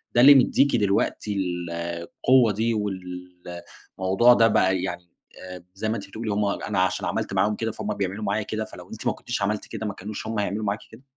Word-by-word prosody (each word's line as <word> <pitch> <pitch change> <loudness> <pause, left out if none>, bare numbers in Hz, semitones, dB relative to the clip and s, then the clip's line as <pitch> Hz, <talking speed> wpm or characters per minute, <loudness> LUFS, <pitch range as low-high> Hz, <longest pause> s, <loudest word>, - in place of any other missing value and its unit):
ده 120 - +6
اللي 140 +3 +10
مدّيكي 135 0 +4
دلوقتي 105 0 0
ال 90 -3 -2
القوة 85 +9 +1
دي 115 +3 0 1.2
والموضوع 95 +6 +5
ده 115 -1 +5
بقى 95 -4 +2
يعني 90 -1 -5 0.4
آآ، 90 -2 -9
زي 110 +3 -3
ما 110 - 0
أنتِ 100 - -6
بتقولي 110 +3 -6
هُم 105 0 +1
أنا 100 - -1
عشان - - 0
عملت - - -2
معاهم 105 +1 +2
كده، 115 +1 -2
فهُم - - -4
بيعملوا 100 +1 -3
معايا 105 +1 0
كده، 110 +1 -3
فلو - - -12
أنتِ - - -6
ما - - +2
كنتيش - - -5
عملتِ 105 +1 -1
كده، 110 - -6
ما 105 - -3
كانوش 105 +3 -7
هُم 110 -1 -2
هيعملوا 105 +2 -2
معاكِ 100 +1 -1
كده؟ - - -15
105 Hz, 205 wpm, -24 LUFS, 95-110 Hz, 1.2 s, اللي